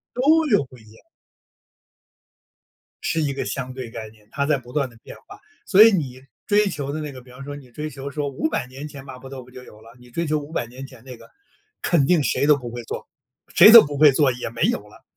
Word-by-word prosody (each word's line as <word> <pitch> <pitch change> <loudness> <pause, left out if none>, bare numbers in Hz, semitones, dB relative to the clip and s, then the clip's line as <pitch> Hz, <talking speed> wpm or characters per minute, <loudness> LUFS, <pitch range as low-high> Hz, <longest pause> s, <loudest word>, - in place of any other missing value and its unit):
都 315 +6 +3
有 205 - +3
不 130 -1 -16
一 110 -2 -18
样。 - - -19 2.0
是 165 - 0
一 145 -2 -1
个 135 - -4
相 130 -2 -5
对 125 -3 -7
概 110 -2 -7
念， 105 -1 -23
它 140 0 -1
在 150 -1 +2
不 125 -2 -13
断 140 -1 -1
地 115 - -19
变 - - -11
化。 - - -13 0.3
所 200 +3 +7
以 225 - +7
你 135 -9 -3 0.3
追 205 0 +3
求 140 -5 -4
的 155 +2 -4
那 150 -2 -6
个， 130 - -11
比 125 - -19
方 125 +2 -11
说 145 +1 -7
你 140 -3 -13
追 150 +5 -6
求 140 0 -7
说 145 0 -3
500 140 0 -2
年 135 +4 -9
前 140 -2 -11
麻 130 -2 -10
婆 135 +1 -11
豆 130 -2 -8
腐 125 - -19
就 125 0 -11
有 105 -3 -16
了， 115 +1 -16
你 125 0 -17
追 170 +7 -3
求 155 0 0
500 145 -3 -4
年 130 +3 -10
前 130 -4 -16
那 130 -2 -10
个， - - -17 0.5
肯 150 -6 +2
定 170 -3 +3
谁 140 - 0
都 150 - +6
不 125 -4 -7
会 120 +1 -6
做， - - -7 0.5
谁 205 +5 +9
都 230 - +12
不 145 -1 -6
会 150 -1 +7
做， 140 -1 +3
也 125 -1 -5
没 115 0 -4
有 - - +2
了。 105 - -19
135 Hz, 260 characters per minute, -22 LUFS, 125-150 Hz, 2.0 s, 都